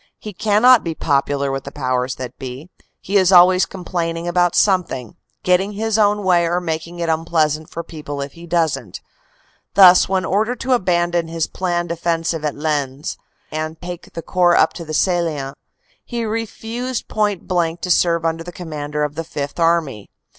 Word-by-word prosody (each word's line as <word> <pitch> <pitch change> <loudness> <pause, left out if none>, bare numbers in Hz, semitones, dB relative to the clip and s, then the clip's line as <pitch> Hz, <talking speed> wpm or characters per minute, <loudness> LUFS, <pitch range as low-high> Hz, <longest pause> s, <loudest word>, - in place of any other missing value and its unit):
He 210 - -8
cannot 220 +5 +4
be 165 -1 -3
popular 140 -1 0
with 135 0 -3
the 140 - -8
powers 130 -2 -1
that 125 -2 -8
be; 135 +6 -8 0.3
he 200 +2 0
is 190 -1 +4
always 185 0 +6
complaining 170 -2 -4
about 175 0 +2
something; 180 - +1 0.3
getting 185 +3 +2
his 220 +1 -1
own 205 0 +3
way 175 -2 +3
or 175 +1 0
making 170 0 -4
it 170 -1 -2
unpleasant 160 -1 0
for 170 - -6
people 150 -3 -7
if 140 0 -4
he 170 +3 -13
doesn 160 - 0
t. - - -7 0.7
Thus, 185 -2 +7
when 190 -1 0
ordered 220 +5 0
to 260 0 +1
abandon 175 -5 +1
his 165 -1 -1
planned 175 -2 -2
offensive 165 -1 -1
at 150 -2 -1
Lens 145 -2 -2 0.4
and 155 +1 -4
take 175 -1 -8
the 165 - -6
Corps 175 -1 +3
up - - +4
to 170 - -8
the 155 0 -4
Salient, 160 -7 0 0.5
he 235 -2 -4
refuses 230 +3 -4
point 210 -3 -1
blank 170 -2 0
to 180 - -2
serve 170 -1 +2
under 165 0 -1
the 175 - -8
Commander 150 -4 -4
of 150 -1 -2
the 165 - -4
Fifth 145 -1 -5
Army. 165 -10 +1
170 Hz, 175 wpm, -19 LUFS, 155-185 Hz, 0.7 s, Thus